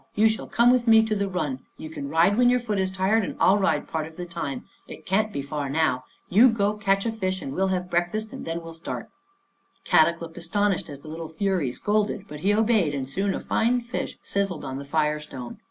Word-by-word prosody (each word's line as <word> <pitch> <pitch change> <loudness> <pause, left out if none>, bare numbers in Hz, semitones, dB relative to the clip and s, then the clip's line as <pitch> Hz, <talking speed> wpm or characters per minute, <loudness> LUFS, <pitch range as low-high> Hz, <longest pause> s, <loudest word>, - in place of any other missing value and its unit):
You 215 +2 +5
shall 220 - -3
come 240 +1 +4
with 250 -1 +2
me 225 -1 +7
to 220 -1 0
the 200 -1 0
run. 150 -8 -2 0.2
You - - -7
can 140 -3 -6
ride 170 +6 +4
when 245 +1 +5
your 250 0 +3
foot 215 -4 -2
is 190 0 +1
tired 190 +4 +1
and - - -4
I'll 195 +3 +5
ride 195 - +1
part 160 -1 -3
of 160 - -15
the 180 - -4
time. 170 -5 -5 0.2
It - - -11
can't 215 +3 +1
be 140 - -3
far 145 -1 -4
now. 140 -4 +1 0.2
You 225 +8 +6
go 210 -2 +1
catch 195 -1 +1
a 230 - +1
fish 190 -4 -2
and 135 - -5
we'll 190 +5 +1
have 185 -1 -1
breakfast, 175 +6 0
then 165 +1 -5
we'll 165 0 -8
start." 165 +1 -6 0.7
Kadok 165 +1 +4
looked 165 -1 -8
astonished 200 +3 0
as 140 -1 -9
the - - -13
little 160 +1 -6
fury 170 -4 0
scolded, 210 - -1
but 150 -3 -8
he 195 +6 +2
obeyed, 210 -8 +2
and 135 -2 -3
soon 195 +8 -1
a - - -3
fine 240 +2 +1
fish 235 0 -5
siz 200 0 0
zled 170 -5 -6
on 135 -1 -5
the 140 - -7
fire 150 +1 +1
stone. 130 -5 -8
185 Hz, 235 wpm, -25 LUFS, 155-210 Hz, 0.7 s, me